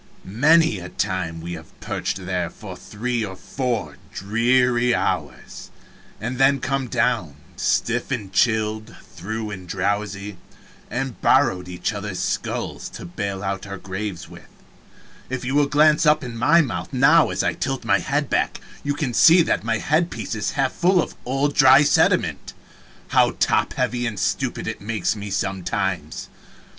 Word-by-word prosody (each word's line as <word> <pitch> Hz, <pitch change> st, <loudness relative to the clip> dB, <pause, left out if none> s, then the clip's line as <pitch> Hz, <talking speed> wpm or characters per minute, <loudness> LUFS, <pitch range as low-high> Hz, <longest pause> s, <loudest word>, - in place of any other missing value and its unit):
Many 145 Hz, -, +3 dB
a 90 Hz, 0 st, -8 dB
time 85 Hz, -3 st, -3 dB
we 85 Hz, +1 st, -6 dB
have 80 Hz, -2 st, -11 dB
perched 95 Hz, -, -4 dB
there 90 Hz, -2 st, -2 dB
for 95 Hz, -2 st, -10 dB
three 115 Hz, +5 st, -3 dB
or 95 Hz, -3 st, -5 dB
four 115 Hz, -, -3 dB
dreary 120 Hz, +3 st, +2 dB
hours, -, -, -3 dB, 0.5 s
and 125 Hz, +3 st, -4 dB
then 135 Hz, +1 st, +4 dB
come 135 Hz, 0 st, -2 dB
down, 90 Hz, -, 0 dB, 0.2 s
stiff 120 Hz, +1 st, 0 dB
and 105 Hz, -8 st, -4 dB
chilled 110 Hz, 0 st, +1 dB, 0.2 s
through 105 Hz, +4 st, -5 dB
and 95 Hz, -2 st, -8 dB
drowsy, 100 Hz, 0 st, -2 dB, 0.5 s
and 130 Hz, +1 st, -4 dB
borrowed 120 Hz, -10 st, +3 dB
each 90 Hz, +4 st, -3 dB
other's 100 Hz, -2 st, -5 dB
skulls -, -, -3 dB
to -, -, -9 dB
bail 95 Hz, +2 st, -4 dB
out 95 Hz, +1 st, -3 dB
our 100 Hz, 0 st, -6 dB
graves 95 Hz, -2 st, -5 dB
with -, -, -14 dB, 0.8 s
if 130 Hz, -1 st, -4 dB
you 130 Hz, -, -2 dB
will 145 Hz, 0 st, +3 dB
glance 150 Hz, +2 st, +4 dB
up 150 Hz, -1 st, +4 dB
in 120 Hz, -2 st, -6 dB
my 145 Hz, +9 st, +4 dB
mouth 130 Hz, -8 st, -4 dB
now 150 Hz, +5 st, +5 dB
as -, -, -1 dB
I -, -, +1 dB
tilt -, -, -3 dB
my -, -, +3 dB
head -, -, -1 dB
back, -, -, 0 dB, 0.2 s
you 145 Hz, 0 st, -1 dB
can 145 Hz, -5 st, -2 dB
see 170 Hz, +7 st, +7 dB
that -, -, 0 dB
my 115 Hz, 0 st, 0 dB
head 155 Hz, +8 st, +1 dB
piece -, -, -5 dB
is 110 Hz, -2 st, -2 dB
half 135 Hz, -2 st, +2 dB
full 180 Hz, +1 st, +3 dB
of -, -, -2 dB
old 135 Hz, +3 st, 0 dB
dry 135 Hz, 0 st, +7 dB
sediment -, -, +1 dB, 0.6 s
how -, -, +3 dB
top -, -, +2 dB
heavy 120 Hz, 0 st, -1 dB
and 105 Hz, -4 st, -4 dB
stupid -, -, -1 dB
it -, -, -4 dB
makes 110 Hz, +1 st, -1 dB
me 105 Hz, -1 st, -6 dB
sometimes! 95 Hz, -4 st, -2 dB
110 Hz, 160 wpm, -22 LUFS, 95-135 Hz, 0.8 s, see